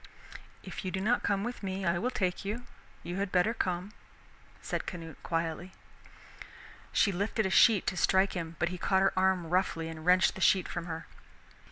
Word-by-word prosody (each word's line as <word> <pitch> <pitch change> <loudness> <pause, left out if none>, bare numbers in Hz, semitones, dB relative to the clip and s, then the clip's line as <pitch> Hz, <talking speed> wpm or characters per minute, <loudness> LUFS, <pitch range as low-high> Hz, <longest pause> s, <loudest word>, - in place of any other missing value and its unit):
"If - - -7
you 185 - -2
do 190 - -3
not 225 +5 +2
come 200 -1 0
with 240 +2 -5
me, 190 -1 -3
I 170 0 +1
will 240 +6 0
take 185 -6 -1
you 220 +5 -4 0.4
you 175 +2 -5
had 195 -1 -2
better 185 +5 +3
come," 185 -2 -2 0.7
said - - -4
Canute 165 -3 -7
quietly. 165 +2 -3 1.2
She 200 - +3
lifted 200 +3 -1
a 190 - -1
sheet 215 -1 +5
to 180 - -1
strike 190 +2 +3
him, 170 -2 -5
but 175 - 0
he 180 0 -6
caught 190 +2 +2
her 195 - +3
arm 185 -3 +1
roughly 170 -3 0
and 160 -1 -8
wrenched 180 +2 +4
the 190 - -9
sheet 190 -1 +4
from 175 0 -5
her. 165 -1 -5
185 Hz, 190 wpm, -30 LUFS, 175-195 Hz, 1.2 s, sheet